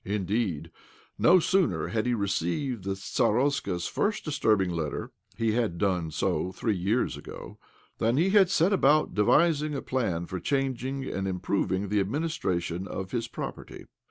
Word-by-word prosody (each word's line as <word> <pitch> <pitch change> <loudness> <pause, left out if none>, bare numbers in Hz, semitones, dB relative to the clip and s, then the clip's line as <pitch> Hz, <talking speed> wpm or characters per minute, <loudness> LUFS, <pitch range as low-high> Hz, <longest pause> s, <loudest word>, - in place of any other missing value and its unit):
Indeed, 95 -5 -2 0.5
no 180 - +6
sooner 190 +1 +1
had 110 +1 -1
he 120 - +2
re 100 -3 -1
ceived 100 - -1
the 95 0 -1
stardsta's 110 -3 0
first 210 +1 -1
disturbing 110 - +1
letter 80 -3 -3 0.3
(he 115 -1 +1
had 110 -6 0
done 90 -4 0
so 90 +3 -1
three 105 +3 -1
years 100 +7 0
ago) - - -10 0.4
than 115 +3 +2
he 180 +5 +3
had 195 -3 +5
set 180 +1 +3
about 150 -4 +3
devising 150 +7 +3
a 140 - -3
plan 95 -10 -1
for 90 +1 -5
changing 135 - -2
and 95 -6 -3
improving 95 +1 -1
the 105 0 +2
administration 95 - -2
of 95 0 -5
his 120 -1 -2
property. - - -7
110 Hz, 155 wpm, -27 LUFS, 95-140 Hz, 0.5 s, no